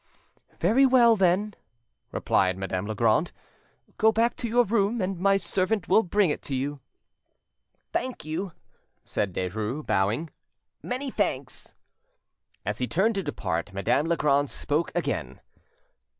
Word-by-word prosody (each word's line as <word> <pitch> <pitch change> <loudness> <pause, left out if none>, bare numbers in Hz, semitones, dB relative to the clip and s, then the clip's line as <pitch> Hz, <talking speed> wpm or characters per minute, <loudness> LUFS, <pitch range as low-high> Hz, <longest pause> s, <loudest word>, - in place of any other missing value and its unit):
"Very 225 +11 +4
well, 250 -3 +6
then," 195 +2 +2 0.6
replied 95 -1 +1
Madame 95 0 -3
Legrand; 110 - +2 0.7
"go 220 0 +5
back 230 +2 +1
to 240 - -3
your 240 +2 +4
room, 220 +1 +1
and 185 -2 -2
my 195 +1 +4
servant 190 +1 -1
will 205 - +5
bring 195 -3 +2
it - - -4
to 135 - -4
you." 140 +2 -3 1.1
"Thank 255 -11 -3
you," 170 +5 -3 0.5
said 100 - -2
Derues, 105 - -3
bowing,—"many 160 - -3
thanks." 140 - -2 0.9
As 105 +3 -2
he 125 - 0
turned 190 - +2
to 195 - -1
depart, 95 - -3
Madame 120 +10 +1
Legrand 145 -4 +2
spoke 150 +3 -1
again. - - -2
170 Hz, 125 wpm, -26 LUFS, -, 1.1 s, well